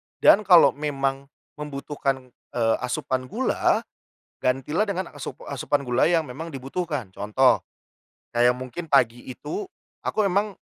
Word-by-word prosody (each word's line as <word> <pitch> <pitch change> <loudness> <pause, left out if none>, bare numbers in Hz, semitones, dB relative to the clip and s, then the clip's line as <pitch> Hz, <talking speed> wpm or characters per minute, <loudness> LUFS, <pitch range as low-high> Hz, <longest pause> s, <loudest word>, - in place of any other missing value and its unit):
Dan - - +6
kalau 170 -7 +8
memang 140 -2 -2 0.3
membutuhkan, 140 -3 -3 0.2
eee, 115 -2 +3
asupan 130 0 -2
gula, - - +1 0.6
gantilah 135 - +1
dengan 190 -4 -2
asup - - -7
asupan 140 -2 -1
gula 125 - +2
yang 165 -2 +3
memang 160 +7 -7
dibutuhkan. 140 - -4
Contoh, 115 +6 +3 0.7
kayak 120 +1 +5
mungkin 130 +7 -6
pagi 120 -3 +3
itu 355 - -5 0.4
aku 210 -2 +1
memang 200 +3 +1
140 Hz, 125 wpm, -24 LUFS, 125-165 Hz, 0.7 s, kalau